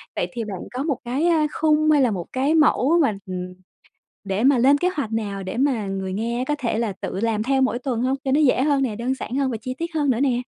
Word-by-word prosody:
Vậy - - -1
thì 235 -2 -3
bạn 195 -4 -6
có 255 +2 -2
một 285 -5 -1
cái, 260 +7 -1
a, 320 -3 +3
khung 310 0 +3
hay 295 -2 +4
là 250 -3 +3
một 180 -4 -4
cái 275 +5 +1
mẫu 315 0 +4
mà, 225 -9 +2
ừm, 180 0 -5 0.7
để 195 +2 -2
mà 270 0 +5
lên 270 +4 +5
kế 355 +5 +1
hoạch 270 -7 -3
nào 205 -3 -3
để 190 +4 -5
mà 255 -5 +1
người 190 -1 -3
nghe 235 +5 -2
có 295 - +1
thể 235 -4 -1
là 225 -4 -1
tự 190 - -4
làm 220 -1 0
theo 265 +2 +1
mỗi 260 -2 +1
tuần 245 -3 -2
hông? 260 +2 +1
Cho 265 - 0
nó 285 - +3
dễ 265 -4 +3
hơn 285 -2 +2
nè, 230 -5 -2
đơn 240 +4 -1
giản 255 -1 -6
hơn 275 -1 0
và 230 - -3
chi 255 +3 -5
tiết 335 0 -4
hơn 295 -3 +1
nữa 240 -3 +1
nè? 255 -3 +1
255 Hz, 275 wpm, -22 LUFS, 220-285 Hz, 0.7 s, mà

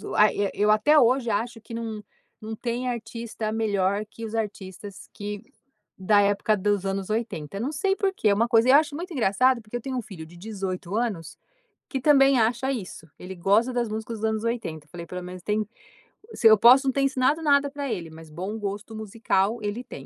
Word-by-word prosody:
ai 210 0 +5
eu - - 0
eu - - -2
eu 210 +1 +2
até 295 +8 +5
hoje 250 -1 +3
acho 230 +3 -2
que 225 +1 -12
não 225 -2 -5 0.4
não 220 +1 -6
tem 240 +2 -3
artista 230 -2 -4
melhor 205 -2 0
que 225 +2 -12
os 220 0 -6
artistas 200 -2 -6
que 205 +1 -6 0.5
da 205 +2 +4
época 205 +2 +2
dos 205 0 0
anos 195 0 -3
80. 200 -6 -3
Não 255 +7 -2
sei 385 +5 0
por 390 -1 0
que 225 - -1
é 205 - +5
uma 225 +4 +2
coisa. 230 0 +4
Eu 265 - +8
acho 300 0 +3
muito 350 +3 -6
engraçado, 255 +1 +2
porque 215 +2 -6
eu - - -8
tenho 260 +1 -4
um - - -1
filho 190 -9 -10
de 165 +2 -16
18 190 -2 -5
anos, 210 -9 -3 0.5
que 265 - -3
também 275 -1 +5
acha 240 +4 +1
isso. 190 -8 -7
Ele 185 +1 -8
gosta 205 +8 +2
das 240 -2 -1
músicas 220 +1 -5
dos - - -4
anos 220 0 -3
80, 220 -11 -3
falei 170 +2 -9
pelo 180 +2 -6
menos 180 0 -9
tem 210 +1 -1 0.7
se 225 - +4
eu 220 -1 +8
posso 255 +6 +7
não 265 - +2
ter 275 - 0
ensinado 275 +3 +1
nada 285 -2 +3
para 285 -2 -4
ele, 175 -6 -4
mas 160 0 -13
bom 185 +8 -5
gosto 205 +2 -5
musical, 215 0 0
ele 210 +4 -3
tem. 255 - -10
220 Hz, 210 wpm, -25 LUFS, 200-245 Hz, 0.7 s, Eu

